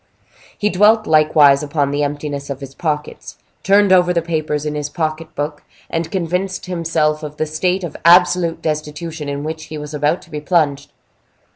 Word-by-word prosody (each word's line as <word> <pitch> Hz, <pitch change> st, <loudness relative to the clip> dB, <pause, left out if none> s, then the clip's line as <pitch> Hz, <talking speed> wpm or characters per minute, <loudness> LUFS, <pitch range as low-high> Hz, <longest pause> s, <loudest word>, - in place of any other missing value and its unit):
He 210 Hz, 0 st, 0 dB
dwelt 215 Hz, +3 st, +4 dB
likewise 155 Hz, -3 st, +5 dB
upon 145 Hz, -1 st, -1 dB
the 145 Hz, +1 st, -1 dB
emptiness 145 Hz, -1 st, -4 dB
of 135 Hz, -1 st, -4 dB
his 135 Hz, -1 st, -9 dB
pockets, 150 Hz, -1 st, -4 dB, 0.2 s
turned 200 Hz, 0 st, +4 dB
over 180 Hz, -1 st, +4 dB
the 170 Hz, -, +1 dB
papers 155 Hz, -3 st, -2 dB
in 150 Hz, -, -2 dB
his 150 Hz, -1 st, -3 dB
pocket 155 Hz, +1 st, -4 dB
book, 145 Hz, +1 st, -4 dB, 0.3 s
and 165 Hz, 0 st, -2 dB
convinced 185 Hz, +2 st, -2 dB
himself 165 Hz, -4 st, 0 dB
of 150 Hz, -1 st, -8 dB
the 155 Hz, -, 0 dB
state 180 Hz, +5 st, -1 dB
of 165 Hz, -4 st, -6 dB
absolute 170 Hz, -1 st, +4 dB
destitution 155 Hz, 0 st, -4 dB
in 140 Hz, 0 st, -4 dB
which 160 Hz, +1 st, -5 dB
he 155 Hz, -, -7 dB
was 150 Hz, 0 st, -7 dB
about 150 Hz, +3 st, 0 dB
to 170 Hz, -, -19 dB
be 150 Hz, -1 st, -5 dB
plunged. 145 Hz, -4 st, 0 dB
155 Hz, 175 wpm, -18 LUFS, 150-170 Hz, 0.3 s, likewise